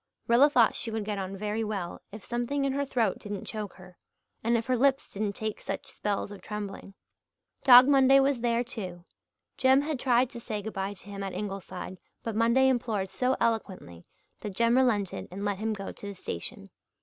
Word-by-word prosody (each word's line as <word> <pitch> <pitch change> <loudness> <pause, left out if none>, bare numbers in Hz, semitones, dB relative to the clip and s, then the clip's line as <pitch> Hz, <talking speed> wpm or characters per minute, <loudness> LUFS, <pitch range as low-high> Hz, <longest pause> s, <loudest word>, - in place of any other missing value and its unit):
Rilla 245 +5 +6
thought 245 -6 +4
she 230 - -1
would 220 -2 -3
get 205 -1 -3
on 195 0 -5
very 210 +2 -2
well 200 -5 -4
if 210 -1 -9
something 245 +4 -1
in 270 - 0
her 280 +1 0
throat 240 -4 0
didn't 205 -1 -6
choke 210 -3 -5
her, 185 -1 -15 0.4
and 235 +1 +3
if 225 - -3
her 255 - +1
lips 270 +2 +1
didn't 205 0 -2
take 215 -1 -4
such - - -5
spells 205 0 -2
of 205 - -10
trembling. 205 -2 -7 0.7
Dog 250 0 +9
Monday 270 -1 +6
was 270 -3 +2
there, 235 0 +1
too. 185 -8 -6 0.5
Jem 265 +1 +5
had 300 -3 -2
tried 250 0 +2
to 240 - -7
say 215 -3 -4
good 220 - -5
bye 195 +1 -3
to - - -12
him 200 -1 -7
at 195 -1 -4
Ingleside 195 -2 -6 0.2
but 225 -2 -3
Monday 235 +4 +4
implored 225 -7 0
so 255 +6 0
eloquently 190 - -2 0.4
that 205 -3 -6
Jem 235 +2 +3
relented 220 -7 +1
and 195 +3 -5
let 200 -2 -1
him 220 +1 -1
go 195 -2 -4
to 205 - -10
the 200 - -6
station. 85 - -6
220 Hz, 200 wpm, -28 LUFS, 200-250 Hz, 0.7 s, Dog